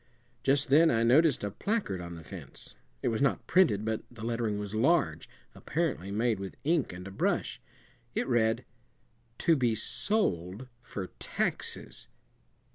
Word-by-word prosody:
Just 135 0 +2
then 160 +3 +7
I 115 -4 +2
noticed 140 +4 +4
a 100 - -2
placard 200 - -2
on 85 -1 -7
the 80 - -10
fence; 70 - -10 0.3
it - - +2
was 115 +1 -1
not 135 - +1
printed, 115 - +3
but 110 -1 -1
the 115 -3 -11
lettering 115 -3 -1
was 105 0 -5
large, 145 +9 +2 0.2
apparently 150 - -2
made 110 +1 +1
with 95 -1 -7
ink 160 -1 +1
and 90 +1 -8
a - - -8
brush. 95 - -1 0.5
It - - 0
read 120 -1 +2 0.7
TO 165 - +4
BE 120 -5 +2
SOLD 110 - 0
FOR 95 -5 -6
TAXES. - - -3
115 Hz, 150 wpm, -30 LUFS, 100-140 Hz, 0.7 s, then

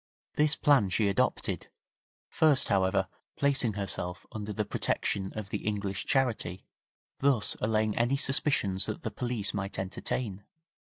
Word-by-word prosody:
This 150 0 +5
plan 135 -10 +4
she 100 +3 +1
adopted, 100 - -1 0.6
first, 150 -4 +3
however, 95 0 +2 0.3
placing 135 -5 +1
herself 95 -3 -3
under 105 -1 -5
the 105 0 -2
protection 95 -1 -1
of 105 -2 -5
the 105 - -1
English 100 -2 -3
charity, 120 -9 0 0.5
thus 135 -6 +2
allaying 110 0 +1
any 120 +4 +2
suspicions 130 -9 +2
that 110 - -5
the 110 - -3
police 120 -2 -2
might 100 -1 -4
entertain. 100 +1 -4
105 Hz, 130 wpm, -29 LUFS, 100-125 Hz, 0.6 s, This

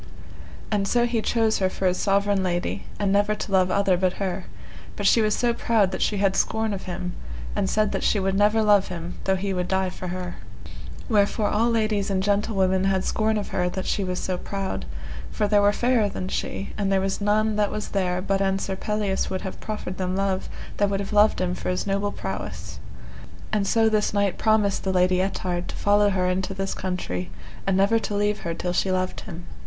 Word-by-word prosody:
And 200 -2 +1
so 240 +3 +3
he 235 -2 0
chose 225 -1 +1
her 190 -1 +2
for 190 - -4
his 180 0 +2
sovereign 200 0 +2
lady, 175 -1 -2
and 200 -2 0
never 205 +1 +3
to 210 - -6
love 185 -1 +4
other 195 -1 +2
but 185 0 +1
her, 190 -2 -3 0.5
but 205 - -4
she 225 - +5
was 215 -1 +2
so 240 -1 +1
proud 220 -5 +2
that - - -4
she 210 - +1
had 195 -1 +2
scorn 220 +1 +1
of 195 - -5
him, 180 0 -4 0.4
and 195 -2 0
said 215 -1 +1
that - - -2
she 210 - +2
would 195 0 0
never 210 +3 +3
love 205 -2 +4
him 175 -1 -6
though 190 - +3
he 195 +1 -2
would 180 -1 -1
die 190 -1 0
for 180 - -7
her. 180 0 -5 0.7
Wherefore 210 -1 +2
all 225 +3 +2
ladies 215 -3 +1
and 190 -1 0
gentlewomen 195 -2 +1
had 190 -1 +1
scorn 220 0 +1
of 205 - -3
her 180 -1 0
that 190 +1 -4
she 200 - 0
was 180 -1 -2
so 185 -1 -2
proud, 195 - -4 0.4
for 210 - 0
there 205 0 +4
were 205 0 +5
fairer 235 -1 +2
than 185 -1 -5
she, 195 - -3
and 200 -1 +1
there 195 - +3
was 195 +1 -2
none 215 +1 +2
that 205 -1 +2
was 210 - -4
there 180 -2 0
but 195 0 0
an 195 0 +2
Sir 195 0 -3
Pelleas 210 0 -1
would 185 - -3
have 190 - -7
proffered 210 -4 -5
them 185 0 -1
love, 195 -1 -1 0.3
they 205 - +3
would 195 0 -1
have 200 +1 -4
loved 210 +1 +4
him 180 -1 0
for - - -4
his 180 - -1
noble 200 +1 0
prowess. 95 - -6 0.7
And 205 -2 +1
so 225 +1 +3
this 215 -1 +1
knight 200 -2 +1
promised 215 -3 +2
the 190 - 0
Lady 185 0 +3
Ettard 180 -2 -2
to - - -6
follow 205 0 +3
her 185 -2 +1
into 190 +1 -1
this 195 0 -2
country, 90 - -3 0.4
and 195 -1 +2
never 200 +4 +4
to 210 -1 -3
leave 205 +1 +1
her 170 -2 -4
till 180 +1 -2
she 190 +1 +1
loved 185 0 -1
him. 175 -3 -9
195 Hz, 220 wpm, -24 LUFS, 185-210 Hz, 0.7 s, she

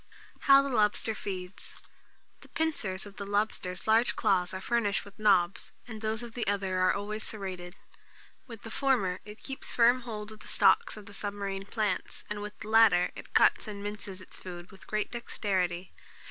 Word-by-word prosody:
How 275 0 +8
the 280 - -2
Lobster 215 +1 +2
Feeds. 185 -3 -7 0.6
The - - -16
pincers 215 -13 -1
of 200 -1 -12
the 200 - -4
lobster's 200 -3 -1
large 225 +2 +4
claws 190 -5 +2
are 190 - -4
furnished 210 -1 +1
with 200 0 -15
nobs, 195 -4 +3 0.2
and 220 -3 -8
those 220 +1 -1
of 235 -1 -8
the 235 -4 -3
other, 195 -2 0
are 185 0 +4
always 210 +2 -3
serrated. 185 -4 -5 0.7
With 230 -4 -10
the 225 - -8
former, 220 -11 +1
it 210 +1 -11
keeps 270 -1 -5
firm 240 +2 +5
hold 215 -3 -6
of 215 - -12
the - - -13
stalks 465 - +3
of 205 -1 -11
submarine 200 -1 -4
plants, 210 -4 -2
and 210 0 -3
with 210 0 -7
the 210 - -6
latter, 215 -6 +5
it - - -11
cuts - - +5
and 205 -1 -6
minces 205 -2 -6
its - - -10
food 175 -1 -9
with 195 - -16
great 215 0 -1
dexterity. 190 -6 -2
205 Hz, 180 wpm, -30 LUFS, 190-220 Hz, 0.7 s, How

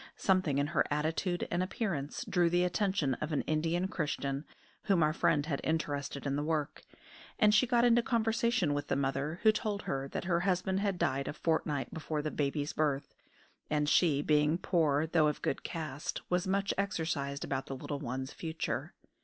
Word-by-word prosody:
Something 185 -7 +2
in 140 - +2
her 145 - +4
attitude 160 +4 -1
and 175 - +1
appearance 185 -7 -3
drew 175 -2 +2
the 175 +1 +2
attention 180 -6 +1
of 150 - -2
an 150 - +1
Indian 165 +4 0
Christian, 145 -5 -2 0.4
whom 190 -6 +3
our 155 0 +2
friend 145 -2 +2
had 145 -4 -2
interested 145 -3 -2
in 140 -1 0
the 145 - 0
work, 155 -2 -2 0.6
and 210 0 +5
she 215 +4 +5
got 240 0 +4
into 240 0 +5
conversation 230 - +1
with 145 0 -2
the - - 0
mother, 140 +4 -1
who 220 - +7
told 215 -1 -2
her 135 0 -2
that - - -4
her 170 -1 +1
husband 185 +1 0
had 200 -2 0
died 135 -3 0
a - - -3
fortnight 150 -5 -1
before 155 -1 -3
the 155 - -2
baby's 145 +1 -1
birth, 145 -2 -1 0.6
and 150 -1 +1
she, 150 -3 +3
being 150 +1 +3
poor 155 -5 +2
though 160 -1 +3
of 150 - -2
good - - -1
caste, 155 -3 -4
was 180 +1 +1
much 195 +1 +1
exercised 155 -8 -2
about 135 -1 -3
the 135 - -4
little 140 +2 -5
one's 130 +1 -4
future. 160 -1 -4
155 Hz, 185 wpm, -32 LUFS, 145-185 Hz, 0.6 s, who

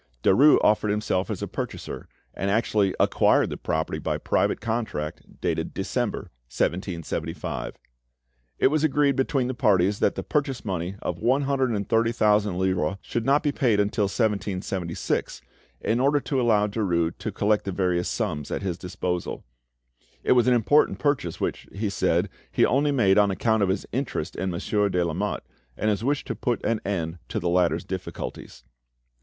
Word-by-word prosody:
Derues 140 +10 +6
offered 105 0 +3
himself 105 -2 0
as - - -3
a - - -2
purchaser, - - -6 0.3
and 95 - -2
actually 105 -2 +1
acquired - - +3
the - - -3
property 80 0 -2
by - - -1
private - - +1
contract, 110 -10 -3 0.2
dated - - -2
December, - - -2 0.2
1775. 85 0 -3 0.8
It - - +4
was 155 +1 +1
agreed 145 -2 +3
between 135 0 +1
the 130 - -2
parties 100 -3 +2
that - - +2
the - - -4
purchase 140 -5 -1
money 90 -1 -3
of - - -3
one 130 +5 +2
hundred 135 -2 +1
and 100 -4 -2
thirty 115 0 +2
thousand 105 -4 +2
livres 95 -2 0
should 115 +1 -3
not 140 +2 +4
be 145 - +2
paid 120 -7 +2
until 105 +1 +1
1776, 95 -4 -2 0.4
in 115 +2 +1
order 140 +3 +3
to 135 -2 -1
allow 110 -4 +3
Derues 90 -6 0
to - - -3
collect 105 0 +1
the 100 - -2
various 90 -2 0
sums 80 - -2
at - - -3
his 90 -3 -3
disposal. 90 -1 -4 0.8
It - - +1
was 125 -1 +5
an 125 - +5
important 135 +6 +3
purchase, 140 - -1
which, - - -3
he 105 0 -2
said, 90 -1 +1 0.2
he - - +4
only 145 +3 +2
made 105 -7 +4
on 100 -1 +4
account 110 +3 +1
of 100 - +2
his 95 +1 -1
interest 120 - -3
in 95 - -2
Monsieur 100 +3 0
de 90 -2 +1
Lamotte, 90 +5 -2 0.3
and 110 - +1
his 105 +1 -2
wish 140 +2 0
to 130 - -3
put 120 +2 -1
an 115 -2 0
end 85 -4 -3
to - - -2
the 85 - -1
latter's 85 -2 +2
difficulties. 95 -8 -6
105 Hz, 170 wpm, -25 LUFS, 90-120 Hz, 0.8 s, Derues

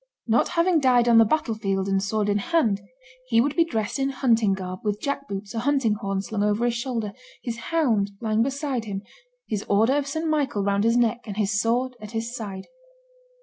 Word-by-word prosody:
Not 230 0 +3
having 335 -1 +4
died 250 -3 +4
on 230 -1 +7
the 225 - +7
battle 235 -1 0
field 195 -3 -1
and 195 0 +1
sword 210 +1 -1
in 205 0 +1
hand, 220 - +1 0.5
he 230 -2 +3
would 280 +5 +1
be 335 - +5
dressed 225 -5 -2
in 270 0 +1
hunting 230 -6 +2
garb, 185 -1 -5
with 210 -1 -1
jack 280 +3 -3
boots, 200 +2 -6
a 230 - -2
hunting 265 -3 +2
horn, 195 -1 -3
slung 210 0 -3
over 210 +3 +1
his 240 - +1
shoulder, 235 -4 -3 0.3
his 235 -2 -4
hound 240 -12 +2
lying 220 -1 +1
beside 270 -2 -1
him, 200 -1 -5 0.4
his 210 -1 -2
order 220 +5 +4
of 290 -1 0
St. 315 +3 -2
Michael 285 -10 0
round 200 +1 +1
his 230 +1 +3
neck, 240 0 +1
and 205 -1 -6
his 210 0 +1
sword 250 +3 0
at 215 +1 -9
his 230 +2 -3
side. 200 -5 -6
225 Hz, 210 wpm, -24 LUFS, 205-260 Hz, 0.5 s, on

